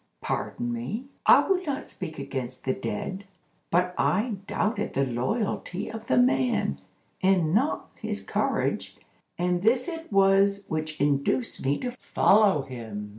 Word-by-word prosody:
Pardon 120 Hz, 0 st, -3 dB
me; 130 Hz, -, -4 dB, 0.2 s
I -, -, +7 dB
would 375 Hz, -1 st, +2 dB
not 280 Hz, -2 st, -3 dB
speak 160 Hz, -4 st, -7 dB
against 130 Hz, -2 st, -5 dB
the 130 Hz, -, +2 dB
dead, 190 Hz, -, -4 dB, 0.4 s
but 180 Hz, +1 st, +2 dB
I 215 Hz, +2 st, +1 dB
doubted 215 Hz, +4 st, -1 dB
the 135 Hz, +1 st, +2 dB
loyalty 175 Hz, -, -2 dB
of 225 Hz, 0 st, -8 dB
the 130 Hz, -, +2 dB
man, 125 Hz, -, +2 dB, 0.4 s
and 185 Hz, -4 st, +3 dB
not 260 Hz, +9 st, +1 dB
his -, -, -4 dB
courage, -, -, -1 dB, 0.4 s
and 180 Hz, 0 st, 0 dB
this 240 Hz, -, +3 dB
it 330 Hz, -4 st, -6 dB
was 195 Hz, 0 st, +4 dB
which 155 Hz, 0 st, -3 dB
induced 145 Hz, -, 0 dB
me 140 Hz, +2 st, +1 dB
to 250 Hz, -, -3 dB
follow 205 Hz, -, +3 dB
him. 110 Hz, -5 st, -7 dB
180 Hz, 140 wpm, -27 LUFS, 130-210 Hz, 0.4 s, I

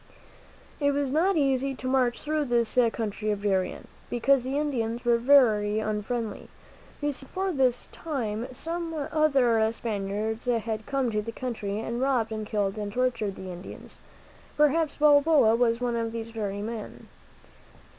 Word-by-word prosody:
It 285 Hz, -1 st, +2 dB
was 280 Hz, -2 st, -1 dB
not 345 Hz, +5 st, +2 dB
easy 270 Hz, -1 st, +1 dB
to 255 Hz, -, -6 dB
march 255 Hz, -2 st, +2 dB
through 305 Hz, 0 st, 0 dB
this 240 Hz, -1 st, +1 dB
country 215 Hz, -1 st, -3 dB
of 205 Hz, -1 st, -2 dB
Darien, 190 Hz, -3 st, -1 dB, 0.2 s
because 260 Hz, +3 st, +3 dB
the 260 Hz, +3 st, -2 dB
Indians 240 Hz, -6 st, -2 dB
were 235 Hz, -1 st, +4 dB
very 225 Hz, -6 st, +4 dB
unfriendly. 215 Hz, +2 st, -3 dB, 0.5 s
You 290 Hz, 0 st, +1 dB
see, 275 Hz, -, -3 dB
before 380 Hz, +4 st, -2 dB
this 260 Hz, -5 st, +1 dB
time 240 Hz, -7 st, -3 dB
some 330 Hz, +5 st, -4 dB
other 275 Hz, -7 st, +2 dB
Spaniards 215 Hz, 0 st, -3 dB
had 225 Hz, -3 st, -1 dB
come 270 Hz, -4 st, 0 dB
to 210 Hz, -1 st, 0 dB
the 230 Hz, +2 st, -6 dB
country, 220 Hz, -4 st, -4 dB
and 235 Hz, +2 st, -3 dB
robbed 255 Hz, -5 st, +1 dB
and 215 Hz, -1 st, -4 dB
killed 205 Hz, -1 st, -1 dB
and 205 Hz, -1 st, -4 dB
tortured 235 Hz, -4 st, -1 dB
the 185 Hz, -1 st, -7 dB
Indians. 180 Hz, +1 st, -8 dB, 0.6 s
Perhaps 300 Hz, +1 st, +2 dB
Balboa 290 Hz, -5 st, +5 dB
was 230 Hz, -1 st, +2 dB
one 245 Hz, -1 st, -1 dB
of 230 Hz, -1 st, -1 dB
these 230 Hz, 0 st, -5 dB
very 205 Hz, -2 st, -3 dB
men. 220 Hz, -1 st, -7 dB
235 Hz, 155 wpm, -27 LUFS, 215-275 Hz, 0.6 s, Balboa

